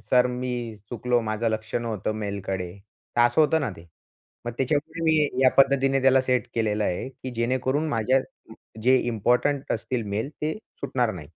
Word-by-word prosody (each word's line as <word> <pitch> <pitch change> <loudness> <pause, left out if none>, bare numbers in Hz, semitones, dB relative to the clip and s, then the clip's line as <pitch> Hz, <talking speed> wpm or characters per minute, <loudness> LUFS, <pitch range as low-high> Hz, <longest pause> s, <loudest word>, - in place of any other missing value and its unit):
Sir 125 -1 +5
मी 125 0 -3 0.4
चुकलो, 120 +1 +1
माझं 110 +1 -1
लक्ष 110 0 -4
नव्हतंं 110 -3 -1
मेलकडे 95 -3 -3 0.4
तर 120 - +4
असं 120 +5 +4
होतं 160 +1 +4
ना 135 -7 -1
ते 85 - -14 0.6
मग 120 - -3
त्याच्यामुळे 150 +5 -1
मी 155 -2 +3
या 130 - +7
पद्धतीने 135 0 +4
त्याला 135 0 +5
सेट 125 -1 0
केलेलं 105 -2 0
आहे 90 +7 -2
की 130 0 -8
जेणेकरून 130 +5 0
माझ्या 130 +1 +2 0.6
जे 130 +3 +5
इम्पोर्टंट 125 +5 +1
असतील 115 +2 -2
मेल 105 +6 -2
ते 155 +1 0 0.3
सुटणार 120 -4 0
नाही. 90 - -7
125 Hz, 165 wpm, -25 LUFS, 110-135 Hz, 0.6 s, या